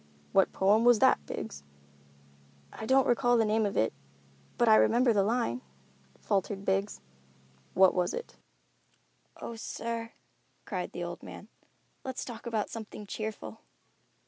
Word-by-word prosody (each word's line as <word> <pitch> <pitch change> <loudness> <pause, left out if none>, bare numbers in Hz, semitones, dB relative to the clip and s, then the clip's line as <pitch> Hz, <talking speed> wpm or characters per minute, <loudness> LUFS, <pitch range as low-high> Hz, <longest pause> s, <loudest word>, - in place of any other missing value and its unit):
"What 195 - +4
poem 205 +4 +3
was 245 -1 +6
that, 70 - +4
Biggs?" 70 - -6 1.1
"I 220 - -7
don't 265 0 +4
recall 245 0 +3
the 225 - +3
name 215 0 +2
of 200 - -4
it, 110 - +2 0.6
but 240 - +3
I 220 - +8
remember 240 +2 +4
the 205 - +3
line," 200 - 0 0.6
faltered 195 - -1
Biggs. 195 +2 0 0.7
"What 190 0 +6
was 180 -1 0
it?" 485 - -6 1.0
"Oh, 235 - -6
sir," 230 0 -5 0.5
cried - - -4
the - - -4
old - - -6
man, - - -10 0.5
"let's 260 -1 -4
talk 235 -1 -8
about 220 -3 -2
something 215 -2 -8
cheerful." 220 +1 -6
220 Hz, 140 wpm, -30 LUFS, 195-235 Hz, 1.1 s, I